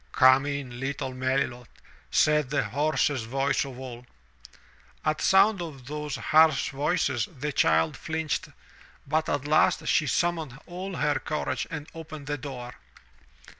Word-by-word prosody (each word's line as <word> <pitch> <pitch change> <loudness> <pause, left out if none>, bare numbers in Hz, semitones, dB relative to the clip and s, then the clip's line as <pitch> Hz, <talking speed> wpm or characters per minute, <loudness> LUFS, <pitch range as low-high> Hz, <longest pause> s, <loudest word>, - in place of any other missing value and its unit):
"Come 130 +2 +6
in, 140 -4 -4
little 135 -1 -3
Melilot," 130 -1 -1 0.4
said 150 -3 +3
the 145 - +1
hoarsest 140 +1 0
voice 135 +3 +1
of 135 -2 -9
all. 125 -2 -9 1.0
At 155 0 0
sound 195 0 +4
of 145 -7 -7
those 150 +1 -4
harsh 155 +4 +4
voices 140 -4 0
the 150 +3 -2
child 80 - +2
flinched, 160 -1 -3 0.6
but 155 +2 0
at 145 -1 -1
last 155 +1 +3
she 155 - +3
summoned 160 -3 -1
all 185 +2 -6
her 150 -2 +1
courage 130 -4 -2
and 155 -2 -6
opened 155 -3 -9
the 145 0 -3
door. 125 -2 -7
145 Hz, 135 wpm, -27 LUFS, 130-155 Hz, 1.0 s, Come